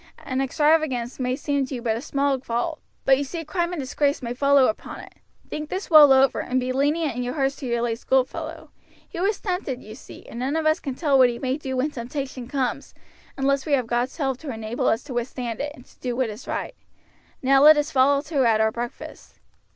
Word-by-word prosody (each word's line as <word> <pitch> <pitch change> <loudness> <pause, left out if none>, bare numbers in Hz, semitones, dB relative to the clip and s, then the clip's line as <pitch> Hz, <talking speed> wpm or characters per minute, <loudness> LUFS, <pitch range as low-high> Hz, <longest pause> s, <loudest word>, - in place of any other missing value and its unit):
An 260 0 -1
extravagance 280 -4 +1
may 250 0 0
seem 285 0 -1
to 265 - -5
you 245 - -5
but 225 -2 +1
a 230 - -4
small 280 -1 0
fault, 250 +6 -3 0.2
but 265 0 +5
you - - 0
see 325 +4 -6
crime 345 +2 -1
and 355 - -4
disgrace 280 +1 0
may 235 0 -3
follow 280 +1 +4
upon 320 - -3
it. - - -12 0.3
Think 305 0 -5
this 375 -1 -5
well 300 -3 +9
over, 265 0 +4
and 255 +1 -1
be 255 0 -2
lenient 290 +1 0
in 250 - -2
your 245 +1 -3
hearts 275 -1 0
to 270 - -6
your 235 -1 0
late 230 -1 -1
schoolfellow. 315 +6 -1 0.4
He 340 - -8
was 400 +4 0
tempted, 360 - -3
you 215 - -10
see, 235 - -13
and 235 - -8
none 265 +4 -1
of 320 -1 -1
us 310 +1 +3
can 270 -3 -5
tell 280 -3 +2
what 255 -1 +7
he 235 - -4
may 260 +1 -1
do 265 -3 -4
when 285 +4 0
temptation 255 0 -5
comes, 260 -2 -3 0.4
unless 275 +1 0
we 295 - 0
have 255 -3 +2
God's 240 +4 -1
help 270 -5 -1
to 300 -4 -6
enable 220 0 -3
us 225 - +1
to 275 - -8
withstand 240 -1 -3
it, 290 +1 -3
and 250 - -16
to - - -23
do 245 -2 -3
what 250 -3 0
is 210 +4 -11
right. - - -3 0.7
Now 270 +1 +5
let 305 +1 +8
us 295 +1 0
fall 280 +1 +3
to 295 -3 0
at 225 -2 +3
our 220 0 +3
breakfast." 240 +1 -7
270 Hz, 235 wpm, -24 LUFS, 250-295 Hz, 0.7 s, well